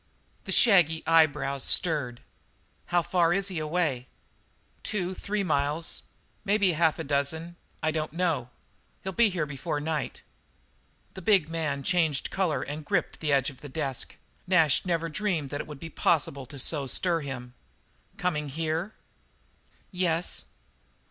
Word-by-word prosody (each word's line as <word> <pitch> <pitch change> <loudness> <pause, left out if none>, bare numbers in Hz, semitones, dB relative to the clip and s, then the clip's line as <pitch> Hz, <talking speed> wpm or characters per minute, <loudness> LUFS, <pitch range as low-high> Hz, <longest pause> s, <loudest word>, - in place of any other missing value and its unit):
The - - -4
shaggy 175 - +5
eyebrows 150 -4 +3
stirred. 145 -9 +2 0.7
"How 175 -1 +2
far 170 -1 +3
is 195 +1 +1
he 180 -4 -3
away?" 155 -5 -1 0.7
"Two 185 -4 -2
or - - -4
three 200 +2 -2
miles 150 0 +1 0.4
maybe 200 -2 +3
half 160 -1 +2
a - - -3
dozen 150 +4 -1 0.3
I 155 - +2
don't 155 -1 -2
know. 165 -8 0 0.5
He'll 190 - -3
be 230 +2 +5
here 180 -5 -1
before 145 +1 -3
night." 150 0 -3 0.9
The 190 - -8
big 185 -4 +3
man 155 -4 -2
changed 165 -5 +1
colour 185 -6 0
and 150 +3 -5
gripped 175 +2 -1
the 150 -2 -1
edge 135 0 +3
of 130 - -18
the 145 - -8
desk. 135 -3 -3 0.3
Nash 165 -6 +5
had - - -11
never 165 -1 0
dreamed 165 -5 -1
that 145 - -2
it - - -9
would 150 -2 -9
be 165 +2 -8
possible 140 -5 +1
to 140 - -10
so 140 +1 -2
stir 170 +6 +1
him. 130 -4 -6 0.6
"Coming 150 -5 -1
here?" 160 +7 -2 1.0
"Yes." 180 -2 0
160 Hz, 150 wpm, -28 LUFS, 145-180 Hz, 1.0 s, shaggy